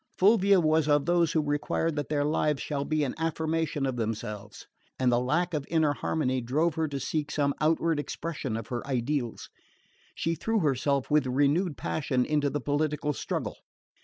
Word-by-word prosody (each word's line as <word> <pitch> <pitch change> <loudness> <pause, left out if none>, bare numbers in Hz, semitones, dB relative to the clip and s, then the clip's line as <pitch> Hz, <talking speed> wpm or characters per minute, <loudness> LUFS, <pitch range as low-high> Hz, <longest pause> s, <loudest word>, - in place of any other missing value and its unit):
Fulvia 200 -1 +5
was 155 -2 +2
of 145 -1 +3
those 170 -2 +2
who 155 - +2
require 145 +3 0
that 145 -3 -4
their 145 -1 +1
lives 150 -1 +1
shall 140 -1 -2
be 155 +1 0
an 135 - -1
affirmation 160 -2 -1
of 130 -2 -2
themselves; 105 -2 -4 0.3
and 130 -1 +2
the 120 - +3
lack 170 +8 0
of 150 -3 -1
inner 160 -3 +2
harmony 130 -4 -1
drove 150 +8 +1
her 160 0 -1
to 140 -2 -4
seek 150 +1 -2
some 140 -1 +1
outward 160 0 +2
expression 145 -6 -4
of 115 - -7
her 120 -1 -2
ideals. 130 -2 -2 0.6
She 165 - -1
threw 220 +6 0
herself 140 -1 0
with 150 -3 +3
renewed 145 +5 +1
passion 130 -5 -1
into 150 -2 +1
the 145 - -2
political 150 +1 -1
struggle. - - -3
150 Hz, 175 wpm, -28 LUFS, 135-160 Hz, 0.6 s, Fulvia